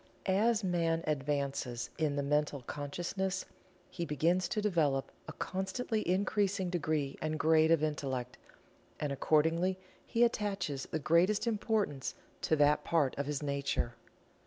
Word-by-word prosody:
As 215 +3 +2
man 165 -3 +1
advances 140 -4 -2
in 150 -3 +1
the 140 - 0
Mental 145 -1 0
Consciousness 175 +8 -3 0.5
he 175 - -4
begins 170 +4 +1
to 215 - -1
develop 160 -10 +1 0.2
a - - -6
constantly 195 +4 -2
increasing 190 -1 +1
degree 155 -5 -1
and 155 0 -1
grade 160 0 +4
of 165 -2 +4
Intellect, 130 -5 -2 0.6
and 145 -2 -1
accordingly 165 +6 +2 0.3
he 230 - +2
attaches 195 - -1
the - - -1
greatest 170 - +3
importance 210 - -1 0.3
to 160 - +2
that 150 0 +4
part 155 -6 +1
of 140 - -1
his 150 0 -2
nature. 140 -4 -1
160 Hz, 135 wpm, -33 LUFS, 145-190 Hz, 0.6 s, grade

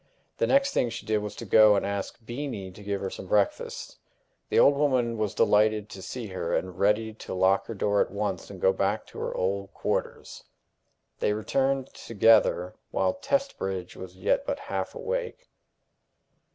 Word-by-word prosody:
The - - +2
next 275 +1 +3
thing 120 - +1
she 115 -1 -7
did 110 0 +1
was 105 -1 -6
to 115 - -7
go 110 0 +6
and 100 - 0
ask 100 -1 -3
Beenie 120 -6 -5
to 100 - -13
give 100 -1 -2
her 95 - -3
some 95 - -8
breakfast. 100 +1 -1 0.5
The - - +1
old 140 - +6
woman 130 -5 +1
was 105 -2 -2
delighted 105 0 +3
to 95 - -9
see 120 +4 -6
her, 95 -3 -2
and 90 -1 -3
ready 105 +2 +2
to 110 - -7
lock 95 +1 +3
her 115 - -5
door 100 +1 +2
at - - +1
once 100 -3 -3
and 100 -2 -9
go 95 +2 +4
back 100 +3 -1
to - - -11
her - - -2
old 100 +1 -1
quarters. - - -3 0.8
They 105 - +1
returned 135 +5 0
together, 105 -5 +3 0.2
while 275 - +1
Testbridge 275 - -2
was 95 - -9
yet - - +1
but - - -2
half - - -4
awake. - - -4
105 Hz, 180 wpm, -27 LUFS, 100-125 Hz, 0.8 s, go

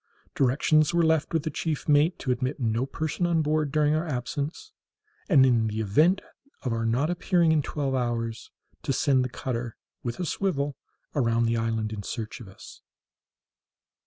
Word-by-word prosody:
Directions 150 +5 +3
were 170 - +4
left 160 -1 +2
with 165 -3 0
the 155 - -3
chief 155 0 -3
mate 150 +4 +4
to 130 - -2
admit 130 +3 -2
no 115 +1 0
person 155 +4 -2
on 165 -2 +2
board 150 -1 0
during 150 0 +2
our 155 +2 0
absence, 145 - -4 0.6
and, 140 -7 +6
in 115 -3 +3
the 110 0 -3
event 155 - +3 0.4
of 125 - -1
our 115 0 -1
not 135 +8 +1
appearing 175 -2 +2
in 155 -1 +3
twelve 140 -1 -2
hours, 115 -3 -2 0.3
to 135 - -1
send 135 -1 +2
the 125 - -3
cutter, 120 -2 -4 0.2
with 120 +4 -4
a 180 - -1
swivel, 145 -7 -1 0.4
around 115 -4 +2
the 115 0 +1
island 110 -1 -1
in 105 - -5
search 110 +2 -5
of 120 - -10
us. 95 - -13
135 Hz, 175 wpm, -26 LUFS, 115-155 Hz, 0.6 s, and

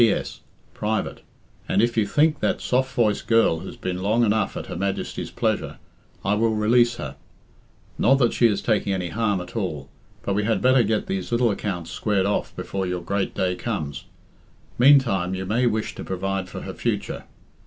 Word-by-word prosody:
"P. 115 - +7
S. - - -2 0.3
Private. 110 +1 -2 0.5
And - - +2
if 120 +2 +2
you 110 -3 +2
think 150 +6 +3
that - - 0
soft 130 +1 0
voiced 110 -3 +1
girl 115 -8 +4
has - - -8
been 90 0 -3
long 110 +5 +2
enough 110 0 0
'At - - -5
Her - - -6
Majesty's 100 +2 -3
pleasure,' - - -1 0.5
I 100 - +2
will 110 +1 +2
release 120 +3 +3
her. - - -7 0.8
Not 135 - +5
that 125 -4 +2
she 120 - +5
is 100 -3 -1
taking 105 -3 +1
any 90 -2 -2
harm 105 -2 0
at 90 - -10
all, 80 -11 -3 0.3
but 100 - -1
we 105 +1 +1
had 110 +1 +1
better 130 0 +5
get 110 -1 0
these 95 +2 -3
little 120 -1 +3
accounts 90 -5 -4
squared 100 -3 0
off 100 - -1
before 95 -1 -3
your 90 -1 -2
great 100 +2 -2
day 90 -1 +1
comes. 90 - -4 0.7
Meantime 120 -9 +5
you 95 0 -4
may 120 +6 +2
wish 110 -1 -1
to - - -7
provide 95 0 -3
for - - -7
her - - -6
future. - - -3
105 Hz, 190 wpm, -24 LUFS, 95-115 Hz, 0.8 s, P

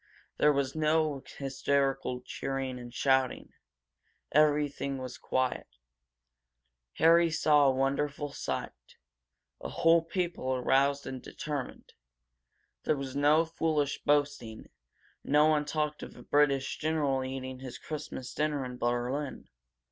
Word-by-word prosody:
There 150 - +5
was 140 -2 0
no 155 -2 +1 0.2
hysterical 135 -1 0
cheering 135 0 -4
and 120 0 -9
shouting; 130 0 +1 0.8
everything 145 -2 +2
was 130 -1 -7
quiet. 130 -1 -1 1.3
Harry 170 +1 +5
Fleming - - -4
saw 150 -2 +4
a - - +5
wonderful 140 +2 -1
sight - - -5 0.6
a - - -6
whole 165 0 +4
people 165 -6 -2
aroused 140 +3 +2
and 130 -1 -6
determined. 145 -4 -6 0.9
There 155 - +1
was 135 -1 -5
no 150 +3 +4
foolish 155 -3 -1
boasting; 140 -7 0 0.5
no 150 +2 +4
one 155 -1 +3
talked 150 0 -2
of - - -9
a - - -11
British 140 -2 +2
general 150 -4 0
eating 130 0 -5
his 130 -1 -8
Christmas 145 -4 -6
dinner 150 -3 -1
in 125 0 -7
Berlin. 120 +4 -2
140 Hz, 120 wpm, -30 LUFS, 130-150 Hz, 1.3 s, There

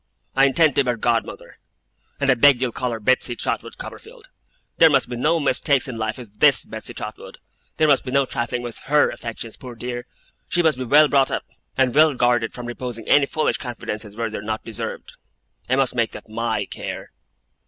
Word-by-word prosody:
I 135 +1 +5
intend 150 +2 +4
to 140 - +5
be 125 - -2
her 120 - 0
godmother, 115 0 -2 0.6
and 140 -1 +3
I - - +6
beg 130 +1 +5
you'll 125 -2 -1
call 125 +2 -3
her 115 -1 -4
Betsey 125 +2 +1
Trotwood - - -4
Copperfield. - - -11 0.5
There 165 - +8
must 135 -3 +2
be 125 - -4
no 155 +7 +1
mistakes 140 -1 +2
in 120 -3 -6
life 110 0 -2
with 110 -5 -13
THIS - - +5
Betsey - - -9
Trotwood. - - -8 0.4
There 155 - +3
must 140 -3 +4
be 130 - -6
no 140 +1 +2
trifling 120 0 -3
with 120 -2 -7
HER 145 +2 +3
affections, 115 -1 -7
poor 125 -2 -10
dear. 120 +1 -5 0.4
She 175 - +1
must 155 -5 +2
be 130 - -3
well 150 +5 +6
brought 135 -2 +3
up, - - -3 0.3
and 130 -2 +2
well 155 -1 +5
guarded 120 -2 +2
from 125 - -8
reposing 120 -2 -6
any 145 -1 +5
foolish 155 - 0
confidences 110 -4 -6
where 115 -1 -3
they 110 - -4
are - - -8
not 110 +1 -4
deserved. 115 0 -6 0.5
I 130 - +3
must 135 -1 +1
make 115 -2 0
that - - -10
MY 115 +1 -2
care. - - -7
125 Hz, 205 wpm, -22 LUFS, 115-140 Hz, 0.6 s, There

